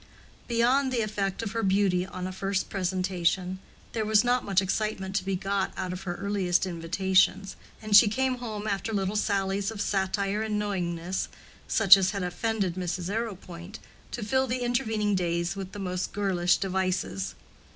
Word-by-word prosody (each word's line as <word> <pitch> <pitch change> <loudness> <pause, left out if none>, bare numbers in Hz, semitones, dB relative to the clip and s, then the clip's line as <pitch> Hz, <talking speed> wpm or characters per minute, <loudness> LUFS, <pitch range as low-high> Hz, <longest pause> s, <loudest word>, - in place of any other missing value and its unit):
Beyond 250 +3 +2
the 245 -2 +1
effect 205 -1 -2
of 210 - -3
her 230 +1 -1
beauty 190 -2 +2
on 185 -1 -6
a 185 - -3
first 195 +1 -2
presentation, 185 -1 0 0.3
there 225 - -1
was 215 0 +4
not 245 +1 +2
much 195 -2 +2
excitement 195 0 -2
to 185 - -1
be 195 0 -1
got 195 +1 -1
out 180 -1 -3
of 180 - -6
her 175 -1 -2
earliest 195 -2 0
invitations, 190 +3 +1 0.3
and 215 -1 +2
she 210 +2 +9
came 255 +3 0
home 215 -3 -5
after 205 +1 -2
little 195 0 -1
sallies 195 -1 0
of 220 -2 -7
satire 200 +1 0
and 215 -1 -1
knowingness, 180 -3 -2 0.4
such 200 -3 +7
as 190 -1 +1
had 200 -2 -3
offended 190 +1 -1
Mrs. 180 0 -3
Arrowpoint, 195 -4 -5 0.3
to 240 - -5
fill 260 +4 +1
the 250 0 -2
intervening 225 -4 0
days 170 -1 0
with 195 -1 -6
the - - -8
most 185 -2 -3
girlish 180 -3 +2
devices. 190 0 -2
195 Hz, 170 wpm, -27 LUFS, 185-215 Hz, 0.4 s, she